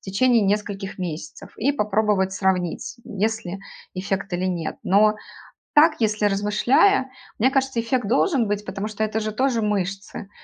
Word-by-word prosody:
течение 230 Hz, +5 st, +3 dB
нескольких 200 Hz, -1 st, -2 dB
месяцев, 155 Hz, -4 st, -6 dB
и 275 Hz, +6 st, +1 dB
попробовать 210 Hz, -5 st, +1 dB
сравнить, 190 Hz, -3 st, -1 dB
есть 220 Hz, +2 st, -2 dB
ли 180 Hz, +2 st, -5 dB, 0.4 s
эффект 195 Hz, +1 st, -3 dB
или 175 Hz, +1 st, -1 dB
нет. 175 Hz, -3 st, -2 dB
Но 210 Hz, +2 st, +4 dB, 0.6 s
так, 305 Hz, +1 st, +6 dB
если 215 Hz, -1 st, +1 dB
размышляя, 240 Hz, -, +2 dB, 0.3 s
мне 260 Hz, +4 st, +3 dB
кажется, 265 Hz, -3 st, 0 dB
эффект 235 Hz, -1 st, -1 dB
должен 260 Hz, -, +2 dB
быть, 205 Hz, 0 st, -2 dB
потому 205 Hz, +1 st, -4 dB
что 215 Hz, 0 st, -3 dB
это 215 Hz, 0 st, -1 dB
же 215 Hz, -1 st, -3 dB
тоже 250 Hz, 0 st, +1 dB
мышцы. 195 Hz, -1 st, -3 dB
210 Hz, 150 wpm, -23 LUFS, 195-230 Hz, 0.6 s, так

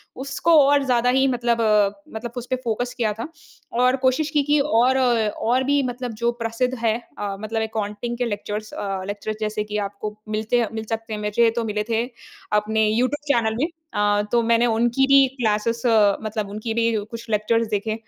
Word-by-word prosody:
उसको 280 Hz, +5 st, +2 dB
और 285 Hz, 0 st, +4 dB
ज़्यादा 245 Hz, -1 st, +2 dB
ही 265 Hz, +2 st, +3 dB
मतलब 240 Hz, -2 st, 0 dB, 0.5 s
मतलब 230 Hz, +1 st, -5 dB
उसपे 245 Hz, +2 st, -2 dB
फ़ोकस 245 Hz, +2 st, -2 dB
किया 220 Hz, -3 st, 0 dB
था, 225 Hz, +5 st, -6 dB, 0.5 s
और 250 Hz, +2 st, +3 dB
कोशिश 265 Hz, +4 st, +2 dB
की 295 Hz, -1 st, +1 dB
कि 295 Hz, +1 st, +2 dB
और 260 Hz, -2 st, +3 dB
और 240 Hz, 0 st, +1 dB
भी 285 Hz, +1 st, +2 dB
मतलब 250 Hz, -1 st, -4 dB
जो 235 Hz, 0 st, +2 dB
प्रसिद्ध 230 Hz, +3 st, -1 dB
है 225 Hz, -1 st, +1 dB, 0.2 s
अ, 200 Hz, -1 st, -3 dB
मतलब 220 Hz, +1 st, -3 dB
अकाउंटिंग 220 Hz, +2 st, -4 dB
के 245 Hz, -, 0 dB
लेक्चरर्स 210 Hz, 0 st, -4 dB
अ, 195 Hz, -2 st, -3 dB
लेक्चरर्स 205 Hz, +1 st, -4 dB
जैसे 215 Hz, 0 st, -1 dB
कि 210 Hz, -, -1 dB
आपको 205 Hz, +1 st, -7 dB
मिलते 215 Hz, +3 st, 0 dB
हैं 230 Hz, -, +1 dB
मिल 220 Hz, 0 st, -4 dB
सकते 225 Hz, -1 st, -4 dB
हैं 210 Hz, -, -3 dB
वैसे 210 Hz, +3 st, +3 dB
तो 235 Hz, -, 0 dB
मिले 210 Hz, -1 st, -2 dB
थे 230 Hz, +1 st, +1 dB, 0.5 s
अपने 220 Hz, +1 st, +1 dB
यूट्यूब 250 Hz, +7 st, +1 dB
चैनल 220 Hz, -2 st, +1 dB
में 310 Hz, -, +2 dB, 0.3 s
अ, 205 Hz, 0 st, +2 dB
तो 240 Hz, -, +3 dB
मैंने 230 Hz, +1 st, +4 dB
उनकी 240 Hz, +4 st, +2 dB
भी 275 Hz, -1 st, +6 dB
क्लासेज़ 230 Hz, +1 st, 0 dB, 0.4 s
मतलब 215 Hz, -1 st, -3 dB
उनकी 215 Hz, +2 st, -4 dB
भी 230 Hz, 0 st, +1 dB, 0.2 s
कुछ 230 Hz, 0 st, -8 dB
लेक्चर्स 225 Hz, +2 st, +1 dB
देखे। 215 Hz, +1 st, -1 dB
230 Hz, 185 wpm, -22 LUFS, 215-250 Hz, 0.5 s, भी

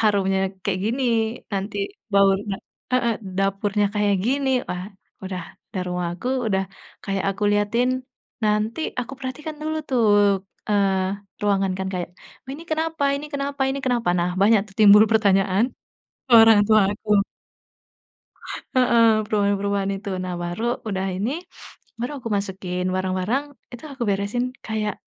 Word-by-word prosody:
harumnya 195 Hz, -3 st, +2 dB, 0.3 s
kayak 185 Hz, -2 st, 0 dB
gini, 255 Hz, +4 st, 0 dB, 0.5 s
nanti 200 Hz, +1 st, -3 dB, 0.4 s
bau 200 Hz, 0 st, +6 dB
da 200 Hz, -1 st, -4 dB, 0.4 s
heeh, 235 Hz, -3 st, +2 dB, 0.2 s
dapurnya 195 Hz, +1 st, +1 dB
kayak 205 Hz, -1 st, +2 dB
gini, 270 Hz, +3 st, +1 dB, 0.2 s
wah, 180 Hz, 0 st, -3 dB, 0.4 s
udah 185 Hz, -2 st, -4 dB, 0.3 s
udah 185 Hz, -, -2 dB
rumah 180 Hz, -1 st, -2 dB
aku, 185 Hz, +9 st, -5 dB, 0.2 s
udah 190 Hz, 0 st, +1 dB, 0.4 s
kayak 195 Hz, -1 st, -2 dB
aku 200 Hz, +2 st, -3 dB
liatin, 205 Hz, +4 st, +2 dB, 0.6 s
nanti 215 Hz, +5 st, 0 dB, 0.2 s
aku 250 Hz, +2 st, -6 dB
perhatikan 300 Hz, +4 st, -6 dB
dulu 315 Hz, 0 st, -2 dB
tuh, 245 Hz, -4 st, +2 dB, 0.6 s
eee, 195 Hz, -1 st, +1 dB, 0.3 s
ruangan 195 Hz, -2 st, +2 dB
kan, 190 Hz, -, -2 dB
kayak 180 Hz, -1 st, -3 dB, 0.4 s
"Ini 290 Hz, +4 st, -7 dB
kenapa 320 Hz, -1 st, -1 dB
ini 295 Hz, +2 st, -6 dB
kenapa 280 Hz, -1 st, -2 dB
ini 275 Hz, -, -2 dB
kenapa." 240 Hz, -7 st, +1 dB
Nah, 175 Hz, +1 st, +1 dB
banyak 210 Hz, +1 st, +5 dB
tuh 195 Hz, -, -18 dB
timbul 210 Hz, 0 st, +8 dB
pertanyaan 195 Hz, -1 st, +3 dB, 0.6 s
ke 250 Hz, -, -4 dB
orang 225 Hz, -2 st, +7 dB
tua 215 Hz, 0 st, +6 dB
aku. 210 Hz, -1 st, +2 dB, 1.5 s
Heeh, 235 Hz, -3 st, +5 dB, 0.2 s
perubahan-perubahan 200 Hz, -1 st, 0 dB
itu. 200 Hz, -, -8 dB, 0.2 s
Nah, 180 Hz, -1 st, -3 dB
baru 175 Hz, +5 st, -4 dB, 0.3 s
udah 190 Hz, -1 st, -2 dB
ini, 205 Hz, +6 st, -1 dB, 0.7 s
baru 245 Hz, +5 st, -3 dB
aku 235 Hz, -, -6 dB
masukin 185 Hz, -2 st, -3 dB
barang-barang, 185 Hz, +8 st, 0 dB, 0.3 s
itu 245 Hz, +5 st, -10 dB
aku 270 Hz, -2 st, -6 dB
beresin 200 Hz, +5 st, -1 dB, 0.2 s
kayak, 215 Hz, -2 st, -2 dB
205 Hz, 140 wpm, -23 LUFS, 195-240 Hz, 1.5 s, timbul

